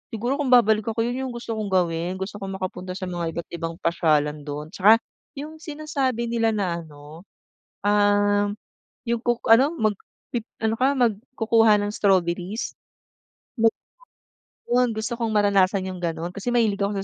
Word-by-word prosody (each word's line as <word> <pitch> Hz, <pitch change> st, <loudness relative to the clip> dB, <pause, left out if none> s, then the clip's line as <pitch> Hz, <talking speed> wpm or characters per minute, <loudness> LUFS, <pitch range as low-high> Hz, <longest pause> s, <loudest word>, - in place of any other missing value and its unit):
siguro 240 Hz, +6 st, -1 dB
kung 290 Hz, -, 0 dB
babalik 220 Hz, -3 st, +5 dB
ako, 225 Hz, 0 st, -1 dB
yun 245 Hz, +3 st, -2 dB
yung 250 Hz, -, -6 dB
gusto 240 Hz, -1 st, -6 dB
kong 215 Hz, -1 st, -2 dB
gawin 175 Hz, -2 st, 0 dB
gusto 190 Hz, +2 st, -5 dB
kong 195 Hz, -1 st, -5 dB
makapunta 185 Hz, 0 st, -4 dB
sa 190 Hz, -, -6 dB
mga 170 Hz, -2 st, -3 dB
iba't 170 Hz, -, -4 dB
ibang 165 Hz, 0 st, -4 dB
pasyalan 150 Hz, -3 st, +1 dB
do'n. 150 Hz, +1 st, -6 dB
Tsaka 210 Hz, +5 st, +5 dB, 0.3 s
yung 300 Hz, +3 st, -7 dB
sinasabi 290 Hz, -6 st, -2 dB
nila 230 Hz, -1 st, +1 dB
na 185 Hz, -5 st, -1 dB
ano, 150 Hz, +3 st, -13 dB, 0.6 s
ah, 205 Hz, 0 st, +3 dB, 0.5 s
yung 235 Hz, -1 st, -1 dB
kuk 240 Hz, 0 st, -1 dB
ano 265 Hz, +8 st, +6 dB
magpi 220 Hz, -, -3 dB, 0.2 s
ano 220 Hz, 0 st, +2 dB
ka 270 Hz, +2 st, +3 dB
mag 235 Hz, -6 st, +2 dB, 0.2 s
kukuha 225 Hz, -2 st, +4 dB
ng 205 Hz, -, -1 dB
strawberries, 190 Hz, 0 st, 0 dB, 0.9 s
mag 225 Hz, 0 st, +6 dB, 1.0 s
'yon 245 Hz, 0 st, +2 dB
gusto 220 Hz, +2 st, -3 dB
kong 230 Hz, -1 st, -2 dB
maranasan 200 Hz, -2 st, +3 dB
yung 185 Hz, -1 st, -6 dB
gano'n 170 Hz, 0 st, -3 dB
kasi 200 Hz, +4 st, -5 dB
mahilig 225 Hz, -4 st, +2 dB
ako 200 Hz, +1 st, +1 dB
205 Hz, 160 wpm, -24 LUFS, 180-235 Hz, 1.0 s, ano